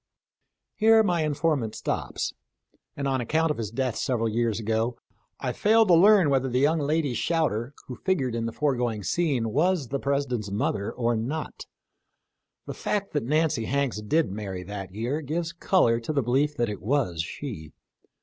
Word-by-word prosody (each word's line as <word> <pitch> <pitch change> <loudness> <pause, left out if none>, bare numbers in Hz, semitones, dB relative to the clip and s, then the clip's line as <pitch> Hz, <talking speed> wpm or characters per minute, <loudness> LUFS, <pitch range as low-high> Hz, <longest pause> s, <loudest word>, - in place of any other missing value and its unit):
Here 220 0 +5
my 175 -5 +1
informant 145 -7 0
stops, - - -3 0.6
and 140 -1 -2
on 130 -2 0
account 160 +6 +1
of 150 - -4
his 110 -3 -3
death 125 +1 -2
several 115 -3 0
years 115 -1 0
ago 115 +2 -1 0.4
I - - -2
failed 220 0 +4
to - - +7
learn 185 -2 +6
whether 135 -1 +1
the 125 - 0
young 155 +4 +3
lady 150 -2 0
shouter 140 -4 -1
who 125 - -7
figured 140 -11 0
in 115 0 -2
the - - -3
foregoing 120 -6 -1
scene 135 - 0
was 155 0 +1
the 140 - -2
President's 135 -7 -1
mother 100 0 -1
or 120 -1 0
not. 135 +8 -4 1.0
The - - -5
fact 200 -1 -2
that 145 -5 -1
Nancy 155 -3 +1
Hanks 135 -4 -1
did 150 +5 +1
marry 95 -3 -5
that 95 0 -7
year 120 +10 -2
gives 165 +3 -3
color 170 -10 +2
to 115 +6 -4
the 140 -3 +1
belief 140 +5 +1
that 120 - +1
it 105 -2 -5
was 110 - 0
she. 85 - -7
135 Hz, 170 wpm, -26 LUFS, 115-155 Hz, 1.0 s, to